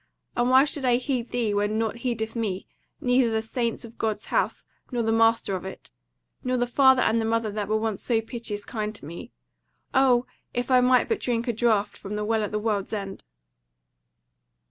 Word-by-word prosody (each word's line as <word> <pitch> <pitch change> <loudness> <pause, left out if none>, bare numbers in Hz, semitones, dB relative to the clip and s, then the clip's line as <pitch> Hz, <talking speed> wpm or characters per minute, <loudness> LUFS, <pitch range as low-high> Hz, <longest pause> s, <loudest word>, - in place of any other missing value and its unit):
And 240 +1 +2
why 260 +1 +7
should 290 -1 -2
I 250 -2 +4
heed 250 -1 -2
thee 235 -4 0
when 205 +1 0
nought 225 0 -1
heedeth 230 -2 -3
me, 205 -5 -2 0.3
neither 250 -1 +3
the 220 0 -1
Saints 235 +1 -2
of 230 0 -14
God's 220 -2 -1
House, - - 0 0.3
nor 240 -2 0
the 225 - +1
Master 225 -3 +3
of 185 - -5
it; 190 - -9 0.5
nor 255 -1 0
the 245 - +2
father 265 +1 +5
and 230 +1 +2
the - - -1
mother 225 -1 0
that 205 -1 -3
were 215 +1 +1
once 220 -2 -2
so 230 -3 +1
piteous 225 -3 -4
kind 215 -1 -4
to 205 - -8
me? 170 +10 -8 0.6
O 255 -2 +4 0.3
if 245 +2 -1
I 255 -1 +6
might 250 0 +4
but 450 - 0
drink 240 -1 -1
a 240 - +1
draught 220 -2 +1
from 200 +1 -6
the 210 0 -2
WELL 220 0 +1
AT 210 - -2
THE 210 - -1
WORLD'S 210 -1 -1
END!" 195 -2 -5
225 Hz, 205 wpm, -26 LUFS, 215-245 Hz, 0.6 s, why